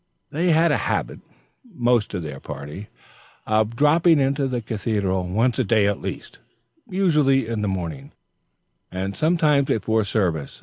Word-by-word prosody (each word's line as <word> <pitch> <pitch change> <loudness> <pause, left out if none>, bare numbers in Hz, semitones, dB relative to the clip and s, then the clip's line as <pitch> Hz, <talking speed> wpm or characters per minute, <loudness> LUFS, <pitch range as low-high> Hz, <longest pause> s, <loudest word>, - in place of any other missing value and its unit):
They 170 +5 0
had 165 +1 +4
a - - +2
habit, - - -2 0.4
most 120 - 0
of 90 - -3
their 75 -3 -7
party, 75 +8 -8 0.6
of 110 +1 +1
dropping 160 +5 +4
into 135 0 +1
the 125 -2 -2
Cathedral 100 -4 -2
once 115 +7 0
a - - +3
day 110 -1 +2
at 100 0 -1
least, - - -7 0.5
usually 150 - +2
in 115 -2 -3
the 105 - -1
morning, 85 -8 -4 0.8
and 95 +2 -4
sometimes 155 -4 +2
before 110 +1 +1
service. 90 -8 -2
110 Hz, 145 wpm, -22 LUFS, 95-140 Hz, 0.8 s, had